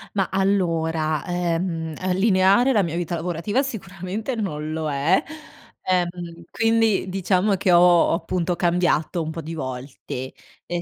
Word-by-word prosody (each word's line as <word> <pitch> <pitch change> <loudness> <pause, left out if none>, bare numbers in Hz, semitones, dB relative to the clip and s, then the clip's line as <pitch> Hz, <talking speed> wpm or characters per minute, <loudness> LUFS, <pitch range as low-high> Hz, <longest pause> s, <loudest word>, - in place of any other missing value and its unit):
Ma 195 -2 +1
allora, 165 -6 0
uhm, 170 -2 -2
uhm, 185 0 0
lineare 195 +5 +4
la 215 -6 +3
mia 170 -1 -3
vita 175 0 -2
lavorativa 175 - -1
sicuramente 205 0 -5
non 155 -8 -3
lo 155 -1 -2
è, 145 +7 +2 0.6
ehm, 175 -2 -2
quindi 225 -4 +1
diciamo 190 +2 +1
che 185 0 +1
ho 175 - +7
appunto 175 0 +2
cambiato 175 -2 +1
un 160 0 -3
po' 165 +1 -6
di 160 +2 -7
volte, 130 -2 -6 0.3
ehm, 175 0 -3
175 Hz, 140 wpm, -23 LUFS, 165-190 Hz, 0.6 s, ho